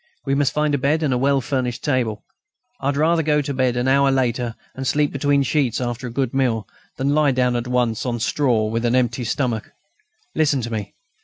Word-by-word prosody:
We 135 - 0
must 140 0 +2
find 150 0 0
a 140 - +1
bed 150 +4 +1
and 140 -4 +1
a - - +1
well 140 +1 +2
furnished 125 -1 -2
table. 120 -7 -1 0.6
I - - -3
had 140 0 0
rather 165 +2 +3
go 150 -1 +2
to 140 -1 -2
bed 130 -2 +1
an 125 +1 0
hour 140 +1 +4
later, 125 -3 0 0.2
and 135 0 -5
sleep 145 +1 +1
between 140 0 +2
sheets 130 -3 0
after 125 0 -3
a - - -6
good 130 0 -1
meal, 120 -6 0 0.3
than 140 +2 +1
lie 150 -1 +3
down 125 -2 +1
at 120 0 -2
once 125 -3 0
on 120 -2 -2
straw 120 -2 +1
with 115 +2 -2
an 120 +1 +2
empty 125 0 +1
stomach. 120 -2 -2 0.6
Listen 145 -3 +2
to 115 0 -5
me. 105 -2 -5
130 Hz, 220 wpm, -21 LUFS, 120-140 Hz, 0.6 s, hour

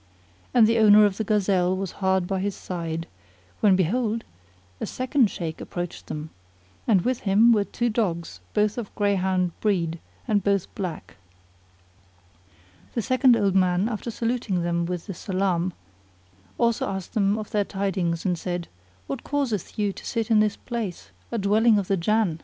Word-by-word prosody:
And 235 -3 +6
the 230 +1 +3
owner 210 -1 +7
of 200 -1 0
the 220 - -1
gazelle 190 -3 +2
was 195 -2 -3
hard 190 -1 +2
by 190 +1 -1
his 200 0 -2
side; 165 -2 -4 0.5
when 200 -3 +5
behold, 220 +5 0 0.6
a - - -3
second 255 -2 +1
Shaykh 165 -4 -5
approached 175 -1 -6
them, 155 +1 -6 0.6
and 200 -5 +4
with 250 +1 0
him 215 +4 +4
were 210 -3 +3
two 240 - -2
dogs 170 - -2 0.2
both 210 +2 +2
of 220 - -7
greyhound 190 -3 +1
breed 170 -6 0 0.3
and 205 -4 +2
both 200 -2 0
black. 180 - -6 1.8
The 230 - 0
second 255 0 +4
old 200 -3 +2
man 185 +1 +3
after 230 0 -4
saluting 230 -6 -1
them 170 0 0
with 180 -1 -4
the 195 - -5
salam, 185 -1 -1 0.9
also 235 -3 +1
asked 190 -2 -5
them 205 -2 +2
of 215 -1 -6
their 210 -3 +2
tidings 190 -4 -2
and 180 -3 0
said 175 -1 -4 0.4
"What 135 - -5
causeth 265 - -2
you 205 -2 0
to - - -11
sit 225 -1 -2
in 220 - +6
this 210 -1 +2
place, 230 -7 -5 0.2
a 235 - -1
dwelling 215 +2 +4
of 200 -3 -1
the 195 - +2
Jann?" 190 -2 +1
200 Hz, 165 wpm, -25 LUFS, 180-220 Hz, 1.8 s, owner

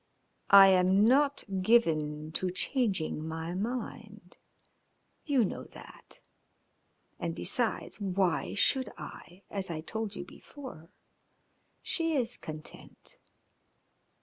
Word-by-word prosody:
"I 195 -1 +10
am 190 +2 +4
not 280 +4 +4 0.2
given 155 -8 +2
to 185 +3 -1
changing 185 - -1
my 160 +1 -4
mind. 230 +6 -5 0.9
You 275 -6 +3
know - - -5
that. - - -11 1.0
And, - - -3
besides, - - -2
why 190 -3 0
should 255 +3 +1
I? 180 +3 -11
As 195 -2 -4
I 160 -2 -4
told 220 +5 -4
you - - -6
before, 255 - -11 0.9
she 330 -3 -1
is 250 -3 0
content." 155 0 -10
195 Hz, 100 wpm, -30 LUFS, 165-240 Hz, 1.0 s, I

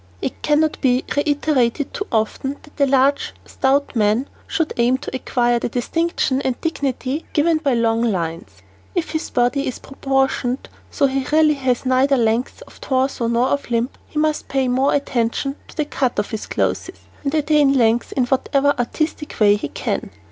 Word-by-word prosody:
It - - -4
cannot 305 +1 +1
be 255 -2 +2
reiterated 285 -3 +1
too 410 - -4
often 240 +5 -1
that 295 -1 -10
a 275 - +2
large, 275 +1 +2
stout 275 +1 0
man 220 +4 +2 0.2
should 325 -2 -1
aim 245 +2 +3
to 265 - -6
acquire 240 -2 +1
the - - -2
distinction 275 +2 0
and 260 -3 -2
dignity 280 -2 -2
given 320 +1 +3
by 280 -5 +1
long 230 -1 +2
lines. 180 -4 -3 0.3
If 350 -2 -1
his 315 0 -3
body 245 +3 +1
is 255 - -3
proportioned 270 -2 -1 0.2
so 285 - +1
he 270 -1 -1
really 310 0 +5
has 260 -3 -1
neither 260 +2 +3
length 230 +1 0
of - - -18
torso 260 -2 0
nor 235 +2 +2
of 285 -2 -1
limb 235 +2 0 0.2
he - - -9
must 305 0 0
pay 270 -1 0
more 260 +3 +2
attention 275 0 -1
to - - -16
the 305 - +1
cut 265 -4 -1
of 205 +2 -1
his 220 -2 -4
clothes - - -1 0.3
and 285 +2 -1
attain 295 -2 +3
length 230 -1 +2
in 255 - +1
whatever 275 +2 +2
artistic 300 +5 -2
way 205 -1 +6
he 205 - -4
can. - - -3
265 Hz, 175 wpm, -20 LUFS, 240-285 Hz, 0.3 s, way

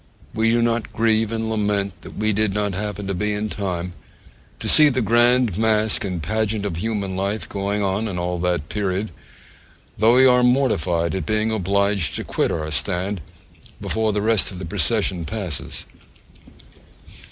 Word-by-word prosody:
We 110 +1 +2
do 115 +1 +2
not 115 -1 -1
grieve 110 -1 +1
and 115 0 -2
lament 105 -3 -1
that - - -11
we 110 0 +1
did 105 -1 0
not 105 -1 -1
happen 105 +1 -4
to 100 - -2
be 105 +3 -1
in 105 +1 -2
time 90 -3 -4 0.7
to - - -5
see 150 -1 +7
the 130 -2 0
grand 120 -1 +3
mask 110 -1 +2
and 90 -5 -4
pageant 110 +2 -1
of 90 -5 -3
human 100 -1 -2
life 100 +3 -2
going 100 +1 -2
on 100 +3 -1
in 95 -4 -4
all 90 0 -2
that 85 -3 -1
period; 100 +1 -2 0.9
though 115 +3 +5
we 130 +1 +6
are 125 -1 +5
mortified 100 - +1
at 95 -5 -3
being 110 +1 +1
obliged 100 -2 +1
to - - -3
quit - - -1
our 80 -1 -3
stand 90 +6 -2 0.6
before 110 -1 0
the 105 0 -1
rest 110 -2 +3
of 95 - -8
the 95 - -6
procession 100 -1 +1
passes. 90 - -5
105 Hz, 170 wpm, -22 LUFS, 95-110 Hz, 0.9 s, see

